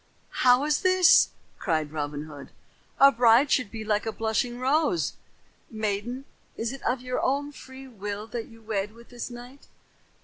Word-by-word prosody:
"How 250 +1 +5
is 300 -1 +1
this?" 370 -2 +6 0.3
cried 155 -5 -1
Robin 145 -1 -4
Hood. 145 -3 -11 0.5
"A 275 0 +8
bride 240 +3 +4
should 240 -6 +2
be 220 0 -7
like 210 0 0
a - - 0
blushing 225 +2 -1
rose. 300 +6 +1 0.6
Maiden, 220 +4 -3 0.3
is 230 +3 -2
it 270 - -9
of 245 +1 -1
your 250 0 -3
own 285 +2 0
free 265 -1 -12
will 205 -3 -6
that 225 0 -6
you 225 -1 -17
wed 210 -1 -3
with 235 0 -16
this 245 0 -6
knight?" 245 +3 -12
235 Hz, 165 wpm, -26 LUFS, 210-265 Hz, 0.6 s, A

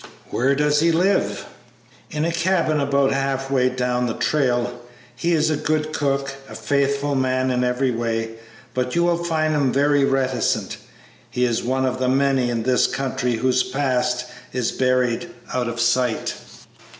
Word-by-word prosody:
"Where 135 +3 +2
does 150 +1 +2
he 165 +2 +3
live?" 185 +5 +1 0.6
"In 155 -1 -2
a 170 - 0
cabin 170 -2 +1
about 140 -1 +2
half 135 0 -1
way 130 -2 +3
down 125 -1 -1
the 115 - -3
trail. 125 -4 0 0.3
He 170 +7 -1
is 155 -1 +2
a - - +2
good 155 +1 -1
cook, 140 -2 -1 0.2
a - - -9
faithful 140 0 0
man 130 -1 +1
every 125 +1 +1
way, 115 -1 -2 0.4
but 125 +2 -2
you 170 - +3
will 170 0 +1
find 155 -2 0
him 140 -4 +2
very 145 +1 +3
reticent. 135 -3 0 0.5
He 125 - -1
is 120 -2 0
one 130 +2 0
of 130 0 -1
the 130 -1 +1
many 135 -2 +2
in 115 -2 -1
this 125 +1 +3
country 130 -2 -2
whose 130 +2 +2
past 130 -2 0 0.3
is 125 -2 0
buried 125 +4 0 0.2
out 125 -1 0
of 120 0 -4
sight." 120 0 +1
130 Hz, 160 wpm, -22 LUFS, 125-145 Hz, 0.6 s, he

